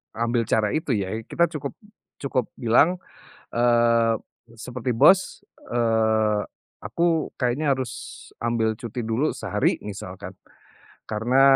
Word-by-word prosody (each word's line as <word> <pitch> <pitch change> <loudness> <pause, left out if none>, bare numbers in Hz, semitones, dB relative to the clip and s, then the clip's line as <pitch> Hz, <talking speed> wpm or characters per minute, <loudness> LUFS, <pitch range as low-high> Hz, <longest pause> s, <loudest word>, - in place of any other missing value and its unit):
ambil 115 0 0
cara 105 -2 +2
itu 155 -5 0
ya. 95 -2 -2
Ya 110 +2 -5
kita 170 0 +1
cukup 140 -2 -5 0.5
cukup 130 -3 0
bilang, 135 +9 +4 0.6
eee, 115 -1 +3 0.4
seperti, 125 +1 -3
"Bos, 185 +11 +4 0.3
eee, 110 -3 +2 0.4
aku 165 +9 0
kayaknya 135 +3 +1
harus 130 -2 -4 0.5
ambil 115 -1 +1
cuti 120 -1 -5
dulu 115 +7 +1
sehari." - - 0
Misalkan. 95 -2 -7 0.8
Karena 115 +5 +2
120 Hz, 115 wpm, -24 LUFS, 110-130 Hz, 0.8 s, bilang